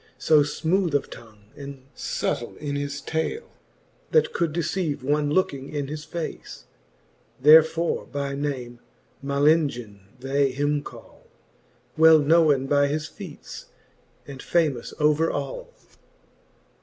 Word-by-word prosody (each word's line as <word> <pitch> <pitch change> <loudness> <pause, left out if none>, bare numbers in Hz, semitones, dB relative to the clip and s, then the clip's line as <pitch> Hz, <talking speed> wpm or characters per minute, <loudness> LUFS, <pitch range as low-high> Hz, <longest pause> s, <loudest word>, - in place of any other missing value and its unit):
So 155 -1 +4
fmooth 165 +3 0
of 145 - -1
tongue, 110 -3 -13
and 140 -2 -9
fubtile - - -3
in 145 -1 -4
his 145 0 -4
tale, 160 - -3 0.6
That 470 - +2
could 170 -2 0
deceive 165 -3 -2
one 145 +2 +1
looking 140 -5 -1
in 145 -2 -4
his 155 +1 -6
face; 170 -2 -7 0.7
Therefore 160 +4 +5
by 140 -1 -4
name 130 -4 -4 0.4
Malengin 140 -7 +1 0.2
they 135 +2 +1
him 145 +2 0
call, - - -14 0.7
Well 160 0 +8
knowen 150 -2 +3
by 145 +1 +3
his 150 +2 -2
feates, - - -10 0.6
and 135 -1 -9
famous 150 -8 0
over 150 +2 +3
all. - - -5
145 Hz, 120 wpm, -24 LUFS, 140-160 Hz, 0.7 s, Well